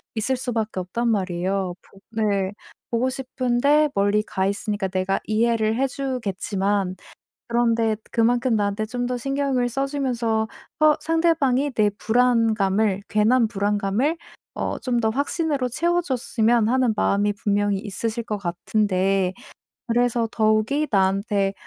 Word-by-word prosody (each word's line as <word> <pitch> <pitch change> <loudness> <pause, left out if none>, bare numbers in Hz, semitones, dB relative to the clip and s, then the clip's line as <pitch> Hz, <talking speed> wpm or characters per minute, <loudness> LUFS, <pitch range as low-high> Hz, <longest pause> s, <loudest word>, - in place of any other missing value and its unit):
있을 250 +4 0
수밖에 225 -6 -2
없단 230 +7 -2
말이에요. 185 -2 -1
보 195 - -20 0.2
네. 200 -2 0 0.4
보고 235 +3 +1
싶은데 265 +3 +1
멀리 205 +1 +2
가 190 -2 -2
있으니까 200 0 -1
내가 185 +1 -1
이해를 220 0 +1
해 270 +3 +1
주겠지만 205 -7 -2 0.5
그런데 230 -2 +2 0.2
그만큼 240 +1 +2
나한테 205 +1 0
좀 245 +2 -3
더 250 0 -2
신경을 275 -1 0
써 270 +3 -1
주면서 235 -6 -1 0.3
어 305 0 +6
상대방이 300 -4 +1
내 210 -2 +3
불안감을, 220 -4 +2
괜한 225 +2 +3
불안감을 205 +7 0 0.4
어 - - -2
좀 245 -2 0
더 220 - +1
확신으로 285 +1 -1
채워 345 +7 +1
줬으면 240 -6 +1
하는 255 -2 +2
마음이 205 0 +1
분명히 205 0 0
있으실 225 +3 -3
것 210 -2 -2
같은데 190 0 0 0.5
그래서 240 0 +1
더욱이 220 +7 +1
나한테 195 0 +1
225 Hz, 290 characters per minute, -23 LUFS, 200-250 Hz, 0.5 s, 어